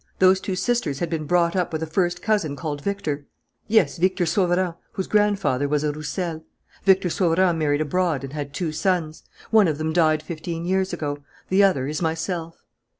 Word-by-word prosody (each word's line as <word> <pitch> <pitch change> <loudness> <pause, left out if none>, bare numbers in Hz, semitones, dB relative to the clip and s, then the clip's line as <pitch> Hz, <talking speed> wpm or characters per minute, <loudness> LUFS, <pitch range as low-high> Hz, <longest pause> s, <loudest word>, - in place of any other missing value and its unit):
Those 185 0 +5
two 190 - -3
sisters 185 - 0
had 170 +4 -3
been 155 -2 -2
brought 170 +1 +2
up 180 -2 0
with 160 0 -2
a - - 0
first 175 +2 -1
cousin 205 -10 +1
called 145 -1 -4
Victor." 150 -7 -3 0.4
"Yes, 210 -9 +3
Victor 185 +1 +1
Sauverand, 175 0 +1 0.2
whose 190 - -2
grandfather 205 -10 +1
was 150 +1 0
a 150 - +1
Roussel. 160 +2 -4 0.4
Victor 190 -2 +4
Sauverand 175 -1 +2
married 145 -1 +1
abroad 155 -2 0
and 135 0 -7
had 145 -2 -4
two 160 +2 -2
sons. 160 -1 -1 0.3
One 215 -4 +6
of 155 -3 -1
them 155 +1 -2
died 155 -2 +3
fifteen 165 +1 -5
years 190 +1 0
ago; 145 -4 -3 0.3
the 190 +2 +4
other 165 -10 +3
is 150 +3 -3
myself." 165 0 -3
170 Hz, 185 wpm, -23 LUFS, 155-185 Hz, 0.4 s, One